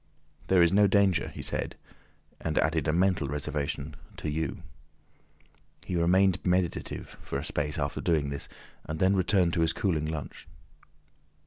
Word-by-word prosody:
"There 90 -2 +5
is 85 - +3
no 100 +1 +6
danger," 100 -2 +3
he - - -8
said, - - -1 0.6
and 80 -1 -2
added 80 -1 +1
a - - +3
mental 90 -3 +2
reservation, 75 +1 -3 0.2
"to 80 -5 -3
you." 80 +2 -3 1.2
He 90 - -3
remained 90 +2 +3
meditative 90 -1 -1
for - - -4
a 70 - -4
space 75 -1 -1
after 70 -2 -2
doing 75 -4 +1
this, 70 - -4 0.3
and 80 +1 -5
then 95 +1 +4
returned 90 -2 +2
to 85 - +1
his 80 0 +2
cooling 80 -6 0
lunch. 80 -2 -6
80 Hz, 150 wpm, -28 LUFS, 75-95 Hz, 1.2 s, no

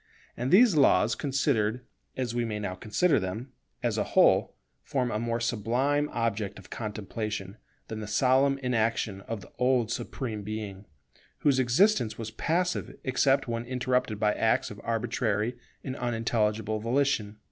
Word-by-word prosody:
And 125 +2 -2
these 205 - +6
laws 115 -6 +4
considered, 125 -4 0 0.3
as 125 -3 -2
we 120 0 0
may 110 -2 -3
now 100 -3 -3
consider 110 - +1
them, 110 +7 -5 0.3
as - - 0
a - - +2
whole, - - +3 0.3
form 125 -3 -1
a 105 - -1
more 115 0 -1
sublime 125 +6 0
object 110 -3 -2
of 95 - -14
contemplation 105 -1 -5 0.3
than 110 - -5
the 105 - -6
solemn 130 +5 +3
inaction 115 -4 0
of 115 -3 -4
the - - -14
old 125 -3 +2
Supreme 120 -2 -4
Being, 105 -1 -6 0.5
whose 140 -3 +3
existence 130 - +3
was 110 -1 -5
passive 175 +10 -1
except 135 +1 +2
when 115 0 -2
interrupted 125 -3 -1
by 105 0 +2
acts - - +1
of - - -9
arbitrary 115 0 -1 0.3
and 130 -2 -4
unintelligible 110 -3 0
volition. 115 -3 0
115 Hz, 145 wpm, -28 LUFS, 105-130 Hz, 0.5 s, these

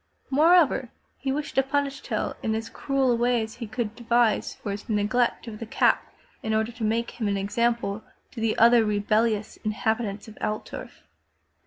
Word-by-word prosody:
Moreover, 310 -3 +4 0.3
he 265 +1 -1
wished 290 +2 -3
to 270 - +4
punish 275 0 -1
Tell 215 -4 -2
in 220 - 0
as 225 +1 -4
cruel 270 -2 +1
a - - +3
way 240 0 +2
as 220 +1 -8
he 235 -2 -5
could 220 -1 -3
devise 235 -1 +1
for 205 - -5
his 205 +3 -7
neglect 220 +3 +1
of 215 -2 -7
the 230 - -5
cap - - +2 0.3
in 220 0 -1
order 220 +2 0
to 230 -1 -7
make 230 +2 0
him 225 -3 -3
an 200 -1 0
example 210 +1 0 0.3
to 235 - -8
the 225 -1 +1
other 235 0 +6
rebellious 215 +1 +1
inhabitants 215 -1 -2
of 220 - -12
Altdorf. 215 0 -5
230 Hz, 180 wpm, -26 LUFS, 215-245 Hz, 0.3 s, other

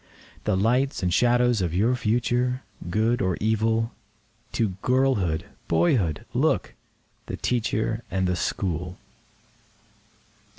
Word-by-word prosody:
The 95 - +2
lights 125 +5 +1
and 90 -1 +1
shadows 120 -1 +3
of 85 -2 -1
your 115 +7 +3
future—good 120 -2 0
or 95 -2 0
evil? 110 +1 +1 0.6
To 110 -3 +1
girlhood, 125 -11 +1 0.2
boyhood 85 - +1
look—the - - -3
Teacher 115 -1 -1
and 95 -1 0
the 90 0 +1
School. 90 0 -2
110 Hz, 95 wpm, -25 LUFS, 90-120 Hz, 0.6 s, shadows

